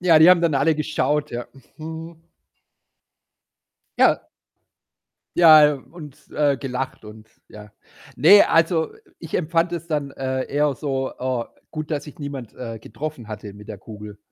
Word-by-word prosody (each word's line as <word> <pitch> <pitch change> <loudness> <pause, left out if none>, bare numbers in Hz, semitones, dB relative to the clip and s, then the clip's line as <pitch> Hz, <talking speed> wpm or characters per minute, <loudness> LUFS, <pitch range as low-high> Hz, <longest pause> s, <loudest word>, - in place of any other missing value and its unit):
Ja, 170 -3 +6
die 160 +3 +8
haben 180 -2 +4
dann 165 -4 +2
alle 160 +4 +3
geschaut, 150 -1 -1
ja. 120 0 -5 0.3
Mhm. 160 +1 -8 1.8
Ja. - - +4 1.2
Ja, 160 -3 +8
äh, 150 - +2
und, 150 0 -13
äh, 145 -2 +1
gelacht, 130 -2 -5
und 110 +1 -13 0.2
ja 105 0 -13 0.5
Ne, 190 +10 +8
also 165 -1 +2 0.3
ich 165 - -10
empfand 165 +1 0
es 170 -1 -5
dann, 145 -4 -2
äh, 130 -1 -3
eher 145 0 +2
so, 135 -2 -3
äh 125 -2 -2 0.3
gut, 155 -1 -5
dass 150 -2 -2
sich 150 0 -13
niemand, 140 -5 -7
äh, 115 -3 -7
getroffen 120 +1 -7
hatte 105 -1 -8
mit 105 +1 -14
der 105 - -6
Kugel. 105 0 -11
145 Hz, 150 wpm, -22 LUFS, 125-160 Hz, 1.8 s, die